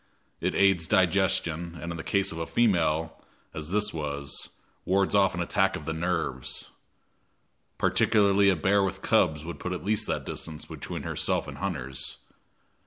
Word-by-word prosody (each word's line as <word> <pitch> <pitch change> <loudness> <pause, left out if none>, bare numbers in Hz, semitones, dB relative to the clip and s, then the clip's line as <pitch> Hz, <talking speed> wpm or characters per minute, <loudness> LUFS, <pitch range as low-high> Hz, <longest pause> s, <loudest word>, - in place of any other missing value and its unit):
It - - -1
aids 95 -4 +4
digestion, 90 -3 +1
and 85 - -5
in 85 -1 -4
case 100 -1 +1
of 85 - -5
a 80 - -3
female, 80 -8 +1 0.3
as 75 0 -6
this 105 +2 0
was, 70 -2 -4 0.3
wards 95 +1 +2
off 100 -3 +4
an 90 - 0
attack 95 +3 +1
of 75 - -7
the 80 - -2
nerves. 80 -6 -2 1.1
Particularly 100 -2 +4
a 95 - +4
bear 100 +5 +3
with 95 -1 -2
cubs 75 0 +2
would 85 - -6
put 90 - -3
at 90 - -6
least 105 +1 +1
that - - -2
distance 80 -2 -6
between - - -6
herself - - 0
and - - -8
hunters. 70 -9 -3
85 Hz, 160 wpm, -27 LUFS, 80-100 Hz, 1.1 s, aids